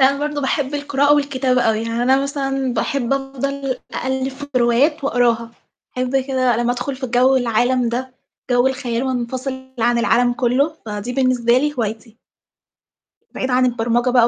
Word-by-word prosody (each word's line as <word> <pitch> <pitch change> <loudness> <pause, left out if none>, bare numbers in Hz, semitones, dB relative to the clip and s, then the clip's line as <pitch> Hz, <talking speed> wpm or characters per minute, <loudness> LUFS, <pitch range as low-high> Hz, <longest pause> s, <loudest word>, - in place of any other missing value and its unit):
يعني 265 0 +6
أنا 280 - -4
برضه 295 0 -2
باحب 275 +1 -1
القراءة 285 0 +2
والكتابة 265 -3 +1
أوي، 225 -1 +1
يعني 230 +1 -2
أنا 265 +2 +3
مثلًا 270 -2 -2
باحب 275 -3 -1
أفضل 275 -1 -3 0.2
أقلِّب 265 0 -1
في 275 +2 -8
روايات 255 +5 +2
وأقراها، 235 -3 +1 0.4
باحب 255 +1 0
كده 260 -3 +1
لمّا 240 +1 +1
أدخُل 255 +2 -4
في 260 - -4
جَو 250 +2 +3
العالم 245 0 +1
ده، 255 +2 -4 0.4
جَو 245 +1 +3
الخيال 255 -3 -1
وانفصل 260 +1 -4
عن 240 +1 +2
العالم 245 +1 +3
كُلّه، 270 +5 +1
فدي 210 +3 -4
بالنسبة 250 -2 +2
لي 295 +2 -1
هوايتي. 225 0 -4 1.2
بعيد 260 - -2
عن 255 0 +3
البرمجة 240 +1 +1
بقى 245 -2 +5
255 Hz, 160 wpm, -19 LUFS, 240-270 Hz, 1.2 s, يعني